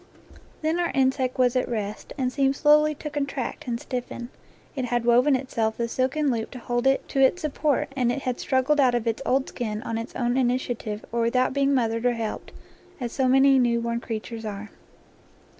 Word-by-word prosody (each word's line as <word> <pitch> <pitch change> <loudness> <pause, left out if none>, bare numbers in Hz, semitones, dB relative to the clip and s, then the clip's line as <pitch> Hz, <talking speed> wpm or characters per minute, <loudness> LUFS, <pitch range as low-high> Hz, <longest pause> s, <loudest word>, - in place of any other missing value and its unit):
Then 320 +3 +1
our 345 - +1
insect 260 -1 +1
was 250 -1 +3
at 255 - 0
rest, 215 -3 -4
and 255 -2 -1
seemed 275 -1 +2
slowly 300 +1 +4
to 300 - -6
contract 280 0 -4
and 235 -1 -2
stiffen. 245 -1 -5 0.5
It 260 -3 -2
had 240 -1 -1
woven 250 +4 +5
itself 230 -4 -1
the 235 - -1
silken 265 +4 0
loop 225 -2 -2
to 255 - -9
hold 240 +1 -1
it 270 0 +2
to 275 - -1
its 315 +7 +3
support, 295 -1 0
and 245 -3 +1
it 275 +2 -4
had 250 -1 -2
struggled 265 +3 +1
out 255 -3 +4
of 240 -1 -1
its 230 +2 -1
old 265 +1 +2
skin 215 -3 -4
on 225 0 -3
its 230 - -7
own 240 -1 0
initia 250 -1 +1
tive 215 -1 -6
or 235 0 0
without 255 +3 +2
being 280 0 +2
mothered 230 -1 +1
or 245 - +2
helped, 225 -2 -5 0.5
as 240 -3 -3
se 265 +1 +1
many 270 +1 +5
newborn 235 -1 +1
creatures 225 -1 -6
are. 210 -1 -6
250 Hz, 200 wpm, -25 LUFS, 235-270 Hz, 0.5 s, woven